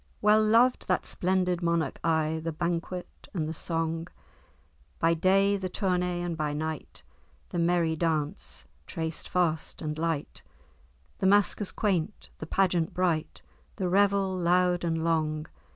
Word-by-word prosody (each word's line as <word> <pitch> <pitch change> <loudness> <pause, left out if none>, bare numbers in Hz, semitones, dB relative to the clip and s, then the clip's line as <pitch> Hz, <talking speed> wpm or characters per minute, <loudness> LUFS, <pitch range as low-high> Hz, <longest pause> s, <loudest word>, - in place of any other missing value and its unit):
"Well 210 +1 +5
loved 235 +4 +3
that 185 - +1
splendid 180 -1 0
monarch 170 -1 0
aye 160 -1 +1
The 165 - -2
banquet 170 +2 -4
and 155 -4 -1
the 160 - -3
song, 165 0 -2 0.9
By 165 0 +3
day 195 +4 +3
the 190 -1 -4
tourney, 180 -2 -1
and 175 -1 -2
by 150 -2 -2
night 155 0 -5 0.5
The 175 - -3
merry 170 -1 +2
dance, 150 - -2 0.2
traced 160 -1 -5
fast 165 -4 0
and 150 0 -4
light, 165 -3 -2 0.8
The 190 - +2
maskers 205 0 +3
quaint, 200 -2 -2
the 155 - -6
pageant 175 -3 +1
bright, 175 -4 -1 0.3
The 190 -3 -2
revel 195 0 +3
loud 180 0 +2
and 165 -1 -1
long. 155 -2 0
170 Hz, 135 wpm, -28 LUFS, 160-185 Hz, 0.9 s, Well